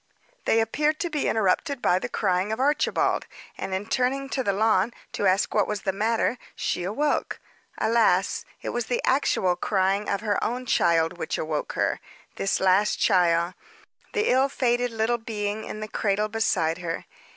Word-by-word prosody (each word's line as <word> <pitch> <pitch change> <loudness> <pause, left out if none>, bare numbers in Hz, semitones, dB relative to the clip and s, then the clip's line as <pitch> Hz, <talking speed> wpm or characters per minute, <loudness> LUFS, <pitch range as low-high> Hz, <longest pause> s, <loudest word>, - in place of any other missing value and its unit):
They 225 - +3
appeared 300 +7 0
to 345 - -2
be 300 -2 -1
interrupted 225 - +1
by 180 -6 +2
the - - -4
crying 185 +1 0
of 220 - -2
Archibald; 285 +3 +1 0.3
and, 195 - -5
in 190 +2 -2
turning 265 +4 0
to 265 - -1
the 200 - +1
lawn 215 +1 +2 0.2
to 200 - 0
ask 190 +2 +2
what 210 -2 +2
was 210 -2 -3
the 190 - 0
matter, 225 +4 0 0.2
she - - -2
awoke. 245 +12 -1 0.4
Alas! 220 -5 +2 0.2
It - - -3
was 240 -2 -2
the 245 - -1
actual 190 -9 +2
crying 195 +2 0
of 200 0 -1
her 210 -2 0
own 250 +2 -2
child 170 -5 +2
which - - -2
awoke 155 -1 -3
her - - 0 0.4
this 195 - 0
last 190 +2 +3
child 175 -3 +3 0.6
the 430 0 +1
ill 265 +2 +3
fated 245 -2 +1
little 230 +1 0
being 215 -1 -3
in 215 - -6
the 215 - -4
cradle 210 0 0
beside 170 -7 0
her. 170 -2 -4
215 Hz, 175 wpm, -25 LUFS, 190-240 Hz, 0.6 s, They